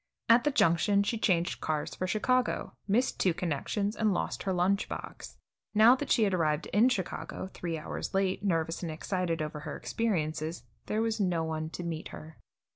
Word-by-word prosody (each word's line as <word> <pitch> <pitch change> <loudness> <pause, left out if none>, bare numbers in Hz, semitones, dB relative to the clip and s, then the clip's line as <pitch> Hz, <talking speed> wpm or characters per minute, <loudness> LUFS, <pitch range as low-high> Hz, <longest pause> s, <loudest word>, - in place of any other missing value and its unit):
At 235 +3 +6
the - - +4
Junction 200 - +3
she 225 +2 -1
changed 175 -4 +1
cars 155 -1 -2
for 185 - -3
Chicago, 250 +5 0
missed 235 +6 +1
two 180 -4 +2
connections, 190 +6 -1
and 220 -2 +2
lost 185 - -2
her 195 - -1
lunch 185 +2 +1
box. - - -7 0.4
Now 220 +3 +8
that 285 +2 -5
she 230 - +4
had 200 -2 +2
arrived 155 -3 +1
In 225 +5 +5
Chicago, 190 -3 -4
three 170 -2 -3
hours 155 - -5
late, 195 0 +1
nervous 165 -4 0
and 170 -3 -3
excited 170 0 -2
over 150 0 -5
her 150 0 -6
experiences, 160 - -2 0.2
there 215 +1 0
was 225 -1 -1
no 180 -5 +1
one 160 -1 -3
to 175 - -6
meet 165 -1 -4
her. 160 0 -11
185 Hz, 185 wpm, -30 LUFS, 160-210 Hz, 0.4 s, Now